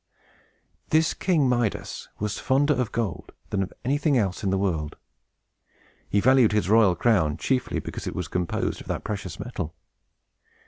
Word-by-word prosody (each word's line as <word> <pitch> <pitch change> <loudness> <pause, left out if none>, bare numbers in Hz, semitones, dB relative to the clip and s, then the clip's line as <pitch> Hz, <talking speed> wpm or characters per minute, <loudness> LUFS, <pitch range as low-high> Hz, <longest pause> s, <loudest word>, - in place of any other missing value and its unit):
This 160 +1 +3
King 165 -7 +2
Midas 120 -4 -1
was 105 0 -3
fonder 145 +3 +3
of 125 -5 -1
gold 110 -8 -3 0.2
than 100 - +1
of 95 - -3
anything 145 +1 +2
else 95 -5 -1
in 100 - +1
the 95 - +1
world. 80 -6 -1 1.1
He 100 - +2
valued 125 -1 +5
his 105 -3 +1
royal 105 -4 +5
crown 90 -11 +2
chiefly 125 +6 0
because - - -5
it - - -4
was 90 -3 -3
composed 90 +2 -2
of - - -13
that - - -3
precious 100 -5 -5
metal. 90 -9 -5
105 Hz, 155 wpm, -25 LUFS, 95-130 Hz, 1.1 s, valued